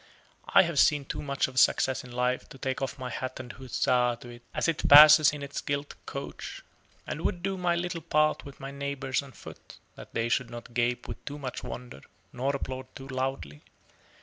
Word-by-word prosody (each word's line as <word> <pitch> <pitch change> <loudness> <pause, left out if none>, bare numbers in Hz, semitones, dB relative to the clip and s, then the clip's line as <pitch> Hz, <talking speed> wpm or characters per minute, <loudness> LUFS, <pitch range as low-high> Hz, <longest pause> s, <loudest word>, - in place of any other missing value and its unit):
I - - +7
have 170 -5 -1
seen 145 -2 +4
too - - -5
much 140 -1 0
of 130 0 -1
success 130 +1 +3
in 125 - -12
life 125 +1 -1
to - - -12
take 130 0 -3
off 135 0 -3
my 130 -2 -5
hat 130 +2 -5
and 125 -2 -8
huzzah 125 -1 +1
to 120 - -10
it 120 0 -11
as - - -1
it 165 -2 0
passes 150 +1 +10
in 145 -1 -7
its 140 0 -5
gilt 145 0 -3
coach: - - -7 0.4
and 155 - -5
would 175 0 -2
do 195 0 -1
my 180 -2 +1
little 170 -1 -3
part 155 0 +1
with 140 -1 -12
my 135 0 -6
neighbors 140 -1 -2
on 140 -1 -12
foot, - - -13 0.2
that - - -13
they 115 0 +1
should 120 0 0
not 120 0 -9
gape 120 0 0
with - - -8
too 145 0 -6
much 130 -3 -6
wonder, 120 - -8 0.3
nor 135 +3 -1
applaud 130 -1 -5
too 135 0 -9
loudly. 130 - -3
135 Hz, 205 wpm, -28 LUFS, 125-145 Hz, 0.4 s, passes